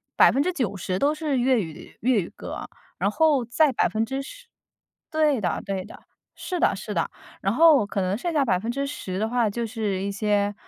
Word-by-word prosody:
90% 245 - +2
都 290 +8 +2
是 305 -3 -1
粤 250 -1 +3
语 160 -4 -9
粤 240 -3 +2
语 170 - -7
歌， - - -8 0.3
然 - - +1
后 310 -5 +3
再 270 +5 +2
10% 270 - -2 0.7
对 305 -6 +2
的 175 -4 -1
对 195 -2 -3
的。 - - -13 0.3
是 360 -2 -4
的 - - +3
是 - - -6
的。 - - 0 0.3
然 195 +2 +1
后 300 -5 +6
可 200 - -2
能 185 +2 0
剩 340 +6 -3
下 295 -3 +3
10% 230 -1 -2
的 220 +2 -1
话 235 -3 +2
就 235 +3 -3
是 210 -4 -2
一 200 - -2
些 205 -1 +1
235 Hz, 170 characters per minute, -25 LUFS, 200-280 Hz, 0.7 s, 后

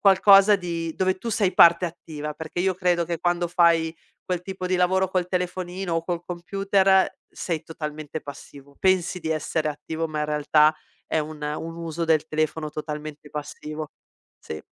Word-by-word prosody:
qualcosa 195 +1 +7
di 170 -3 -4
dove 185 0 +1
tu 235 - -5
sei 195 -4 +1
parte 170 0 +7
attiva 155 -3 -6
perché 160 +3 -5
io 190 0 +1
credo 175 -1 +1
che 170 -1 -3
quando 175 0 0
fai 170 -2 +3 0.3
quel 180 -2 -2
tipo 185 -1 -5
di 185 - +1
lavoro 185 +1 +2
col 185 -2 0
telefonino 180 0 -3
o 165 0 -1
col 175 -1 -3
computer 195 +1 +2 0.2
sei 165 -3 -4
totalmente 155 -1 -6
passivo, 140 0 -12
pensi 185 -1 +1
di 160 - -4
essere 155 0 -1
attivo, 160 +2 -4
ma 155 -1 -3
in - - +1
realtà 150 +1 +3 0.3
è 160 - 0
un 150 0 -5
un 160 +3 -4
uso 165 0 -3
del 155 -2 +2
telefono 155 0 -1
totalmente 150 -1 -6
passivo, 150 +1 -6 0.5
sì. 75 -1 -8
165 Hz, 165 wpm, -24 LUFS, 155-180 Hz, 0.5 s, qualcosa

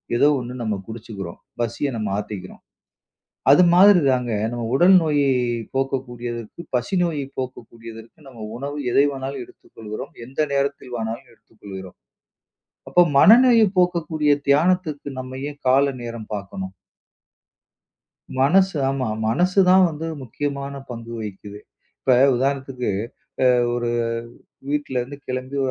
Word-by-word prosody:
ஏதோ 140 - +4
ஒண்ணு 125 0 -6
நம்ம 110 -2 -1
குடிச்சுக்குறோம். 110 -6 -8 0.2
பசிய 120 +5 -1
நம்ம 105 -2 -2
ஆத்திக்கிறோம். 105 -2 -7 0.9
அது 145 +6 +7
மாதிரிதாங்க 145 - +5 0.2
நம்ம 120 0 -4
உடல் 175 +7 +6
நோயை 145 -3 +2 0.4
போக்கக்கூடியதற்கு, 120 -2 -4 0.2
பசி 125 +9 -2
நோயை 155 -5 -1
போக்கக்கூடியதற்கு 115 -2 -8
நம்ம 120 -5 -10
உணவு 140 +3 -5
எதைவானாலும் 135 -1 0
எடுத்துக் - - -22
கொள்கிறோம், 110 -1 -7
எந்த 130 +4 -5
நேரத்தில்வானாலும் 125 -5 -3
எடுத்துக் 115 -1 -28
கொள்கிறோம். 95 -2 -9 0.9
அப்போ 180 - +5 0.2
மனநோயை 230 - +7
போக்கக்கூடிய 165 -4 +2 0.2
தியானத்துக்கு, 155 0 +2
நம்ம 130 0 -7
ஏன் 145 0 -12
கால 130 +2 +5 0.2
நேரம் 115 -2 -7
பாக்கணும்? 95 -1 -6 1.7
மனசு 185 +6 +4
ஆமா. 135 -3 -2 0.2
மனசுதான் 185 - +4
வந்து 160 +1 -6 0.2
முக்கியமான 140 +2 -4
பங்கு 115 -1 -7
வகிக்குது. 105 -1 -8 0.4
இப்ப 130 - +3 0.2
உதாரணத்துக்கு, 130 -2 -1 0.5
அ - - +5 0.3
ஒரு 120 -1 -1 0.8
வீட்டிலருந்து 140 -2 -2
கிளம்பி 130 +2 -4
130 Hz, 110 wpm, -22 LUFS, 115-145 Hz, 1.7 s, அது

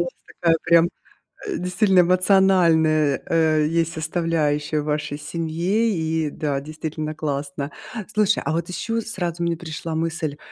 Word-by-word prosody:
вас 175 - -3 0.3
такая 165 -1 +4
прям, 170 0 +5 0.6
э, 400 -3 -3
действительно 185 +1 +2
эмоциональная, 175 -5 +3
э, 155 -2 +3
есть 165 0 0
составляющая 155 -2 0
в - - -7
вашей 150 -1 -2
семье. 170 +8 -1
И 160 -3 -1
да, 145 -1 -2
действительно 155 +1 -5
классно. 140 -1 -3 0.4
Слушай, 210 -2 +2
а - - 0
вот 165 +1 -1
еще 225 +5 -2
сразу 175 -6 -3
мне 170 0 0
пришла 160 -1 -5
мысль, 160 -2 -2
165 Hz, 135 wpm, -22 LUFS, 155-175 Hz, 0.6 s, прям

